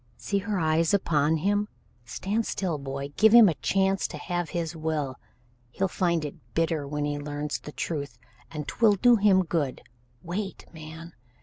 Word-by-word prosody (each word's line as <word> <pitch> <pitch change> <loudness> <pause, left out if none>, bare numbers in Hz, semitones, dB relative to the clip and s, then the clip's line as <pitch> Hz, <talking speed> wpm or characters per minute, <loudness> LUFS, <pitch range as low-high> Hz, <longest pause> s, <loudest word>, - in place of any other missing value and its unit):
See 200 - -1
her 205 0 -2
eyes 160 +2 +2
upon 155 -4 +2
him. 205 +5 +1 0.4
Stand 210 - -2
still, 175 -6 -2
boy; 140 0 -5
give 220 0 +6
him 235 -3 +9
a 170 - +2
chance 195 +4 +1
to - - -8
have 175 -1 -3
his 170 -2 -3
will. 155 -5 -2 0.5
He'll 195 - -1
find 170 -3 0
it 145 - -5 0.2
bitter 160 -3 0
when 150 +1 -2
he 145 0 -2
learns 145 0 -4
the 150 - -9
truth, 145 -6 -4 0.3
and 150 -2 -6
'twill 220 -3 +3
do 240 +4 +5
him 195 -3 +4
good. 155 -6 -2 0.4
Wait, 190 +3 -5
man! 160 +1 -10
165 Hz, 170 wpm, -27 LUFS, 150-195 Hz, 0.5 s, him